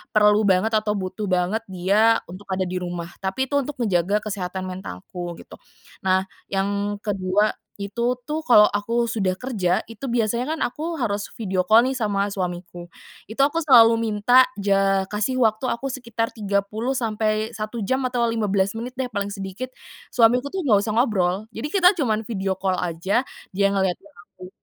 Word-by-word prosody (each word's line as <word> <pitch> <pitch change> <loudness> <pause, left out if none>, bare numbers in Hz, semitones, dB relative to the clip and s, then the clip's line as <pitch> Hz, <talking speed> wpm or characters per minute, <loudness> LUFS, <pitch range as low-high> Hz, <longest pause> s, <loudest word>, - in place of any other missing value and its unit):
perlu 210 0 +5
banget, 190 +4 +3
atau 210 0 -2
butuh 195 +2 -4
banget 185 +4 +1
dia, 200 +5 +2
untuk 195 +3 -11
ada 190 0 0
di 180 0 -3
rumah. 175 -1 -5
Tapi, 195 +8 -2
itu 285 - +3
untuk 295 +2 -6
menjaga 200 +1 +1
kesehatan 190 -3 -4
mentalku, 175 - -7
gitu. - - -13 0.5
Nah, 190 0 +3 0.3
yang 200 +1 -1
kedua 200 +1 +1 0.3
itu 235 +5 -2
tuh, 310 +1 -2
kalau 210 -4 +8
aku 230 +3 0
sudah 195 -5 -1
kerja, 195 -8 -1
itu 230 +4 -9
biasanya 240 +6 0
kan - - -9
aku 320 +6 -4
harus 205 -5 -2
video 190 -4 0
call 230 +3 +6
nih, 265 - 0
sama 205 -5 0
suamiku. 175 -2 -5 0.4
Itu, 255 +5 +1
aku 325 +3 0
selalu 230 -6 +6
minta, 230 +4 +4
ja 195 -1 +2
kasih 215 +5 -1
waktu 220 +3 +1
aku 250 +4 -3
sekitar 235 -3 -3
30 210 +4 -1
sampai 215 -1 -1
1 215 +1 -4
jam 260 +5 0
atau 245 -1 0
15 200 -3 +1
menit 245 +3 -6
deh 260 - -1
paling 200 -1 -2
sedikit, 195 +6 -6 0.5
suamiku 245 +3 +4
tuh 380 -2 -3
nggak 210 -5 +5
usah 215 - -2
ngobrol. 205 -4 +1
Jadi, 225 +7 -4
kita 360 -1 +7
cuman 220 -3 0
video 195 -4 -2
call 190 -1 -1
aja, 180 +7 0 0.3
dia 200 +1 +3
ngeliatin 190 0 -1
aku 180 +1 -14
210 Hz, 170 wpm, -23 LUFS, 190-235 Hz, 0.5 s, kalau